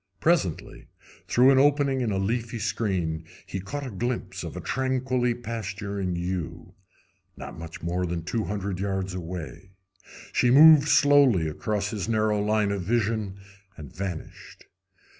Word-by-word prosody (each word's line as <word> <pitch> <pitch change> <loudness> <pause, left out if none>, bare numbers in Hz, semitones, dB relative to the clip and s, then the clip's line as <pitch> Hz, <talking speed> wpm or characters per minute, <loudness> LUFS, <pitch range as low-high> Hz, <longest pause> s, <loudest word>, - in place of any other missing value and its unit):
Presently, - - 0 0.4
through 125 +3 +5
an 135 - +5
opening 140 -1 +3
in 120 - 0
the 100 - -1
leafy 115 +4 -2
screen, 95 -8 -2 0.2
he 95 - -5
caught 140 +10 -5
a 130 - -6
glimpse 120 +5 -3
of - - -7
a - - -3
tranquilly 130 -2 0
pasturing 100 -5 -4
ewe, 85 0 -4 0.6
not - - -8
much 80 0 -9
more 90 +1 -1
than 85 -1 -3
two 110 +5 -2
hundred 100 -2 -3
yards 95 -1 -2
away. 90 +1 -7 0.6
She 125 - +3
moved 150 +2 +8
slowly 140 - +5
across 105 +6 -2
his 105 -4 -4
narrow 110 -2 +1
line 105 -1 +1
of 100 -1 -2
vision 105 -1 -1 0.4
and 75 -2 -11
vanished. 90 -2 -7
105 Hz, 140 wpm, -26 LUFS, 90-120 Hz, 0.6 s, moved